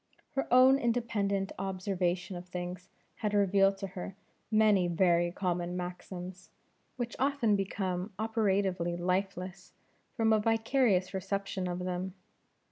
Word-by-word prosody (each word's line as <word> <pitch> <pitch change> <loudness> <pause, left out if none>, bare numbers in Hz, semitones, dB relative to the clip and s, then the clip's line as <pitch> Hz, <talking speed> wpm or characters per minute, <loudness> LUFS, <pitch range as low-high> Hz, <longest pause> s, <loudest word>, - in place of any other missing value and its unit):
Her 270 -2 -2
own 260 +2 +7
independent 215 -6 0
observation 185 -1 -1
of 175 +1 -8
things, 180 +1 -6 0.3
had 210 -2 -1
revealed 195 0 +4
to 195 0 -4
her 185 +1 -6 0.3
many 215 -4 +4
very 175 0 +3
common 180 -1 -2
maxims, 180 +1 -7 0.5
which 240 -1 -3
often 265 -6 +2
become 190 -1 -2
operatively 195 -5 0
lifeless 185 +1 -2 0.4
from 225 -1 +4
a 215 - +4
vicarious 225 -3 +2
reception 190 0 -2
of 175 0 -2
them. 180 +1 -3
195 Hz, 120 wpm, -31 LUFS, 180-215 Hz, 0.5 s, own